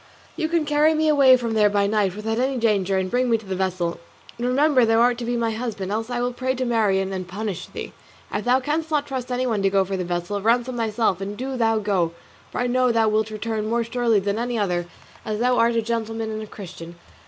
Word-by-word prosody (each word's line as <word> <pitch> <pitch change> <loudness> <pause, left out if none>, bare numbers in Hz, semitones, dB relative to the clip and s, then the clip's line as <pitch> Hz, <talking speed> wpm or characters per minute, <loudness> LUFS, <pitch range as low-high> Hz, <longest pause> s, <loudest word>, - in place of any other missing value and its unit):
You 315 -2 -1
can 335 -2 +1
carry 300 +2 +3
me 315 0 +1
away 275 -4 +6
from 235 -2 -3
there 210 -1 +4
by 200 -1 +2
night 200 -2 +1
without 220 +2 -2
any 260 +1 0
danger, 200 -5 +1
and 185 0 -1
bring 250 0 +1
me 230 - +4
to 220 - -13
the 190 -1 -3
vessel. 185 -2 -2 0.4
And 240 - -1
remember 270 0 +3
thou 225 0 +3
art 240 0 +3
to 240 - -4
be 240 +1 -1
my 230 -1 0
husband, 220 -4 -4
else 225 +2 -2
I 245 -1 -2
will 245 0 -1
pray 260 +1 -1
to 255 0 -2
Marien 200 -5 +1
to 190 - -3
punish 185 +1 -5
thee. - - -7 0.4
If 205 - -2
thou 250 +2 +4
canst 310 +3 -2
not 300 -2 +1
trust 255 -3 -5
anyone 245 -4 0
to 195 - +3
go 195 0 +2
for 190 0 -3
the 185 - -2
vessel, 175 +3 -3
ransom 240 +3 +1
thyself 220 -4 0
and 200 +1 -5
do 265 +1 -4
thou 225 -2 +2
go, 190 -6 0 0.4
for - - -4
I - - +1
know 250 0 +2
thou 225 -1 +3
wilt 215 0 +1
return 215 0 -3
more 235 +1 +1
surely 235 -2 +1
than 200 +2 -2
any 240 0 -2
other, 175 -4 -1 0.4
as 215 -1 -3
thou 250 +1 +2
art 230 0 +3
a 230 - +1
gentleman 225 -1 -3
and 215 0 -4
a 215 - -7
Christian. 175 -4 -10
225 Hz, 245 wpm, -23 LUFS, 200-245 Hz, 0.4 s, away